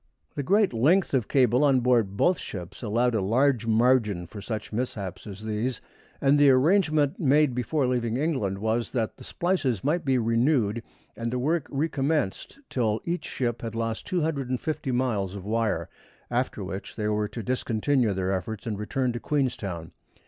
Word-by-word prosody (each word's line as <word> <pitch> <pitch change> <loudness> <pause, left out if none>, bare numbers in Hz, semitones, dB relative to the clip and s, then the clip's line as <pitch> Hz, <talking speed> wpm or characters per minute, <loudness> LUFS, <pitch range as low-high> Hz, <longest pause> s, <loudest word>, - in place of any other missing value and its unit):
The - - -3
great 200 - +3
length 155 +12 +3
of 125 -6 +1
cable 125 0 +3
on 135 -3 +4
board 115 -6 +2
both 180 - +3
ships 90 -4 -7
allowed 120 +2 +1
a 110 - +1
large 120 +4 +2
margin 110 -5 +3
for 100 +4 -9
such 110 +1 -5
mishaps 105 -6 -4
as 100 +1 -8
these, 110 +3 -2 0.4
and 140 +1 +4
the 145 -1 +7
arrangement 155 +1 +3
made 145 -2 +3
before 130 +4 0
leaving 120 -2 0
England 130 - -1
was 110 +3 -1
that 115 -4 -1
the - - -12
splices 150 - -1
might 160 +4 +1
be 135 -3 +2
renewed 115 -1 +2 0.3
and 115 0 -3
the 125 - -1
work 155 +4 0
recommenced 145 - -1
till 110 -4 0
each 175 +1 -2
ship 120 -3 -2
had 115 -1 -5
lost 115 -1 -3
250 150 -4 -1
miles 110 -7 0
of 95 -2 -7
wire, 115 +1 0 0.4
after 120 -4 -1
which 95 +1 -6
they 105 -1 -2
were 105 0 0
to 110 +2 -7
discontinue 125 +1 +1
their 95 0 -1
efforts 105 +4 -4
and 105 -3 -3
return 125 +3 -1
to 120 - -4
Queenstown. 110 - -2
120 Hz, 170 wpm, -26 LUFS, 110-140 Hz, 0.4 s, the